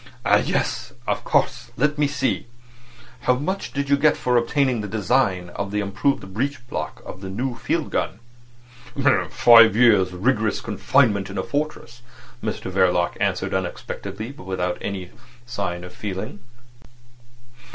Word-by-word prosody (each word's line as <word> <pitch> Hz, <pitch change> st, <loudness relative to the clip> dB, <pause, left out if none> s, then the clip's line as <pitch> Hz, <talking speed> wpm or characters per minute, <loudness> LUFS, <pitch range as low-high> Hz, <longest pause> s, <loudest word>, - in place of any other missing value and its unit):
"Ah! -, -, +6 dB
Yes. -, -, -1 dB
Of -, -, -1 dB
course. -, -, 0 dB
Let's 150 Hz, +1 st, +1 dB
see. 135 Hz, -3 st, -1 dB, 0.7 s
How 125 Hz, +1 st, +2 dB
much 185 Hz, +9 st, -3 dB
did 140 Hz, 0 st, -2 dB
you 140 Hz, -, +4 dB
get 150 Hz, +1 st, +3 dB
for 125 Hz, -1 st, 0 dB
obtaining 125 Hz, 0 st, +2 dB
the 105 Hz, -, -4 dB
design 105 Hz, -4 st, +1 dB
of 100 Hz, +2 st, -4 dB
the 105 Hz, +1 st, -1 dB
improved 100 Hz, 0 st, -1 dB
breech 130 Hz, +3 st, -2 dB
block -, -, -5 dB
of 95 Hz, -, -9 dB
their 95 Hz, -, -6 dB
new 120 Hz, +6 st, -2 dB
field 115 Hz, -, -2 dB
gun?" -, -, -1 dB, 1.1 s
"Five 115 Hz, -3 st, +7 dB
years' 105 Hz, -6 st, +5 dB
rigorous 110 Hz, +2 st, +1 dB
confinement 105 Hz, -1 st, +2 dB
in 100 Hz, -, -6 dB
a -, -, 0 dB
fortress," 145 Hz, -5 st, -4 dB, 0.4 s
Mr 110 Hz, -3 st, -3 dB
Verloc 90 Hz, -2 st, +2 dB
answered -, -, 0 dB
unexpectedly, 110 Hz, +4 st, -4 dB
but 95 Hz, -9 st, -13 dB
without 90 Hz, -1 st, -2 dB
any 95 Hz, -3 st, -5 dB, 0.3 s
sign 100 Hz, -7 st, -3 dB
of 90 Hz, -, -9 dB
feeling. 100 Hz, 0 st, -5 dB
110 Hz, 140 wpm, -23 LUFS, 95-130 Hz, 1.1 s, Five